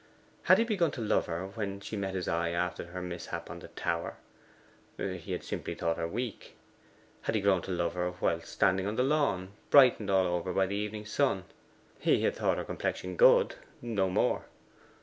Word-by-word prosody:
Had 185 Hz, -, +7 dB
he 225 Hz, -, +4 dB
begun 200 Hz, -8 st, +1 dB
to -, -, -6 dB
love 110 Hz, -1 st, +1 dB
her 85 Hz, +2 st, -3 dB
when 100 Hz, 0 st, -4 dB
she 105 Hz, -, -6 dB
met 95 Hz, -2 st, -3 dB
his 90 Hz, -2 st, -2 dB
eye 85 Hz, 0 st, 0 dB
after 85 Hz, +1 st, -2 dB
her 90 Hz, +1 st, -6 dB
mishap 90 Hz, -1 st, -6 dB
on -, -, -7 dB
the -, -, -10 dB
tower? 85 Hz, 0 st, -3 dB, 0.8 s
He -, -, -4 dB
had -, -, -3 dB
simply -, -, -4 dB
thought 85 Hz, -1 st, -1 dB
her 85 Hz, -, -1 dB
weak. 115 Hz, +4 st, -5 dB, 0.7 s
Had -, -, -1 dB
he 105 Hz, -, +2 dB
grown 95 Hz, -2 st, +3 dB
to 95 Hz, -, -6 dB
love 85 Hz, -1 st, 0 dB
her 90 Hz, 0 st, -2 dB
whilst 85 Hz, 0 st, 0 dB
standing 95 Hz, 0 st, +2 dB
on 105 Hz, -, -2 dB
the 125 Hz, -, +2 dB
lawn 135 Hz, -10 st, +1 dB, 0.2 s
brightened 125 Hz, -7 st, +6 dB
all 95 Hz, -1 st, +4 dB
over 90 Hz, +1 st, -1 dB
by 95 Hz, -, +3 dB
the 100 Hz, +2 st, -3 dB
evening 105 Hz, +1 st, -3 dB
sun? 105 Hz, -, +1 dB, 0.6 s
He -, -, +2 dB
had 475 Hz, -, +1 dB
thought -, -, +1 dB
her -, -, -3 dB
complexion -, -, -3 dB
good: -, -, +5 dB, 0.2 s
no 105 Hz, -6 st, 0 dB
more. 90 Hz, -, +1 dB
95 Hz, 195 wpm, -30 LUFS, 90-115 Hz, 0.8 s, Had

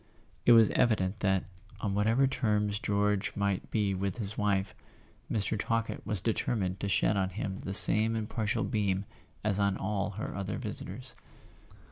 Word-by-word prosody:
It 120 Hz, -, +8 dB
was 115 Hz, -2 st, +6 dB
evident 105 Hz, -3 st, +1 dB
that, 95 Hz, -3 st, +1 dB, 0.4 s
on 100 Hz, -2 st, -2 dB
whatever 110 Hz, +6 st, +2 dB
terms 105 Hz, -5 st, -1 dB
George 105 Hz, +1 st, -1 dB
might 100 Hz, -2 st, -2 dB
be 105 Hz, -3 st, 0 dB
with 95 Hz, +3 st, -3 dB
his 105 Hz, -2 st, -3 dB
wife, 100 Hz, -2 st, -1 dB, 0.6 s
Mr. 110 Hz, 0 st, -1 dB
Talkett 115 Hz, +1 st, -2 dB
was 105 Hz, -5 st, -2 dB
determined 100 Hz, -3 st, -2 dB
to 100 Hz, -, -3 dB
shed 100 Hz, -, +2 dB
on 95 Hz, -1 st, 0 dB
him 95 Hz, 0 st, -5 dB
the 95 Hz, -, -5 dB
same 110 Hz, +2 st, +8 dB
impartial 110 Hz, 0 st, -2 dB
beam 100 Hz, -2 st, -1 dB, 0.4 s
as 105 Hz, -1 st, -1 dB
on 100 Hz, -1 st, +1 dB
all 100 Hz, 0 st, -2 dB
her -, -, -5 dB
other 100 Hz, -1 st, -4 dB
visitors. 120 Hz, +6 st, -6 dB
105 Hz, 155 wpm, -29 LUFS, 95-110 Hz, 0.6 s, It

